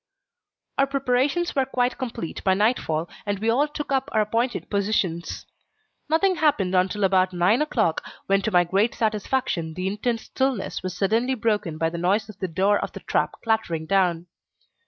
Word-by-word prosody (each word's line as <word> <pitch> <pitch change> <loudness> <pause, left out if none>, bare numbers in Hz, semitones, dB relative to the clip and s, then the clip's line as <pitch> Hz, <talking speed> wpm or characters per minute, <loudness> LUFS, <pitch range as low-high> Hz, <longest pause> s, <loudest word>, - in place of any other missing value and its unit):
Our 275 - +4
preparations 275 +5 0
were 270 -2 +2
quite 250 -1 0
complete 235 -10 -5
by 190 -1 +3
nightfall, 190 -7 +1 0.2
and 205 -1 -2
we 220 +3 +1
all 280 +6 +2
took 295 -1 -6
up 270 +1 0
our 215 - +3
appointed 230 +4 -1
positions. 195 -5 -1 0.6
Nothing 365 +4 +2
happened 250 -13 +2
until 185 +2 +1
about 185 -1 +3
nine 185 +9 +3
o'clock, 220 - 0 0.2
when 195 0 +2
to 205 - -1
my 180 -3 +4
great 195 +7 +1
satisfaction 210 -6 -1
the 185 - -3
intense 220 +4 -1
stillness 265 -6 -2
was 185 -1 -5
suddenly 225 +7 +1
broken 210 -9 -1
by 165 +1 0
the 170 - -4
noise 200 +5 +1
of 210 -2 -11
the 185 - -2
door 195 +4 +2
of - - -4
the - - -8
trap - - 0
clattering 220 -8 0
down. 175 -2 +1
210 Hz, 175 wpm, -24 LUFS, 185-250 Hz, 0.6 s, Our